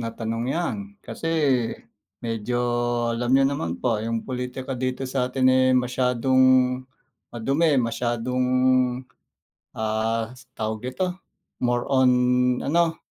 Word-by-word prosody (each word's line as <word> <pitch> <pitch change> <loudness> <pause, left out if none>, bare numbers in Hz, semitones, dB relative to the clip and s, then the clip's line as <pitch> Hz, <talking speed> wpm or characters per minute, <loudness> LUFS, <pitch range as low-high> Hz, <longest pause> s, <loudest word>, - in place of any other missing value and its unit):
na 115 - -3
tanong 115 0 -4
'yan, 175 +4 -1 0.3
kasi 165 - -5 1.0
medyo 115 +1 -2 0.6
alam 120 +1 -2
niyo 135 0 +5
naman 85 -12 -3
po 115 -4 0
'yong 115 0 -3
pulitika 125 +1 -5
dito 130 +1 -2
sa 125 -1 -1
atin, 130 0 +1
eh, 130 0 +4
masyadong 125 +1 +1 0.9
madumi, 140 +6 +1
masyadong, 120 +1 -1 1.3
ah, 110 +1 -1 0.2
tawag 110 0 -3
dito, 185 +8 -2 0.5
more 120 -1 +1
on, 130 -1 +5 0.6
ano, 165 +2 +2
125 Hz, 110 wpm, -24 LUFS, 115-130 Hz, 1.3 s, niyo